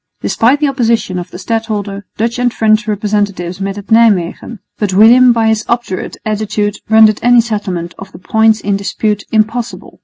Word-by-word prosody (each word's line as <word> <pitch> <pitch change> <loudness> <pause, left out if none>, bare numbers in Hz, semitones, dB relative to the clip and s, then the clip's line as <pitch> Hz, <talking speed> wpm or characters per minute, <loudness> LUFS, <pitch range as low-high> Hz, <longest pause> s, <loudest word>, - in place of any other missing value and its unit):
Despite 250 +6 +1
the 300 - +1
opposition 230 -8 -1
of 175 - -7
the - - -10
stadholder, 205 -1 -4
Dutch 235 +2 -2
and 245 -1 +1
French 215 -1 +1
representatives 205 -3 -2
met 195 +1 -3
at 205 +2 -10
Nijmwegen; 220 -1 +2 0.2
but 200 -3 -1
William 240 +5 +6
by 225 -1 +1
his 220 0 0
obdurate 235 -6 -3
attitude 210 -1 -2
rendered 220 -1 +5
any 245 0 +4
settlement 195 -7 -3
of 195 0 -10
the - - -12
points 220 +3 +1
in 200 0 -1
dispute 205 +1 -2
impossible. 225 +2 -2
215 Hz, 165 wpm, -13 LUFS, 200-230 Hz, 0.2 s, William